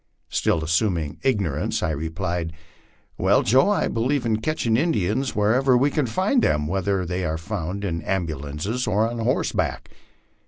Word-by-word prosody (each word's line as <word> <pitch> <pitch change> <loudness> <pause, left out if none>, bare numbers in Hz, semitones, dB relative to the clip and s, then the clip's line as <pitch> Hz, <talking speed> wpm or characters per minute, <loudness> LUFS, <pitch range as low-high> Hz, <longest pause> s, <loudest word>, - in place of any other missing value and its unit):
Still 80 - +1
assuming 80 -2 0
ignorance, 100 - 0
I 85 - +1
replied, 80 +2 -3 0.7
Well, - - +3
Joe, 130 - +4
I 205 - +2
believe 125 +3 0
in 110 -2 +1
catching 120 -5 0
Indians 125 - 0
wherever 125 +5 +3
we 140 +3 +2
can 145 -3 0
find 190 - +1
them, 75 - +1
whether 95 +2 0
they 90 +2 -2
are 80 -2 -1
found 95 +2 -4
in 85 -3 -2
ambulances 85 - -3
or 110 +1 +2
on 120 0 -5
horseback." 120 +3 -1
100 Hz, 150 wpm, -23 LUFS, 85-125 Hz, 0.7 s, Joe